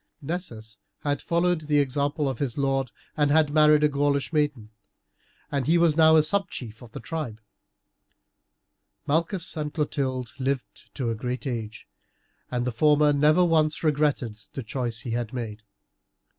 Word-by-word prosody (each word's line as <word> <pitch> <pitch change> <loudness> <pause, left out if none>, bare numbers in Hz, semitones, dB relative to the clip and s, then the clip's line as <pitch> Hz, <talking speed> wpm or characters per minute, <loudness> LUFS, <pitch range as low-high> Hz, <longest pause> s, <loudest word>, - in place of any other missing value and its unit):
Nessus 120 - -6 0.2
had 145 -1 -1
followed 170 0 +1
the 150 -1 +3
example 145 +2 0
of 130 -4 -3
his 135 -5 -2
lord 135 -3 0 0.2
and 145 -1 +2
had 150 0 +3
married 150 -1 +5
a - - +6
Gaulish 145 +1 0
maiden, 145 -8 -1 0.8
and 140 -2 -1
he 165 +2 +4
was 170 -3 +3
now 160 0 +6
a 155 - +6
subchief 155 - -1
in 120 - -12
the - - -7
tribe. 120 -5 -5 1.7
Malchus 165 +4 0
and 150 -2 -3
Clotilde 130 -5 -2
lived 135 -1 -3
to 120 -4 -1
a - - -2
great 125 +4 -4
age, 115 -4 -5 0.6
and 125 -1 -2
the 125 - -1
former 150 +4 +4
never 155 +5 +4
once 155 -2 +1
regretted 145 -8 0
the 135 - -5
choice 120 0 -3
he 120 - -5
had 120 0 -3
made. 110 -4 -5
145 Hz, 155 wpm, -25 LUFS, 125-155 Hz, 1.7 s, a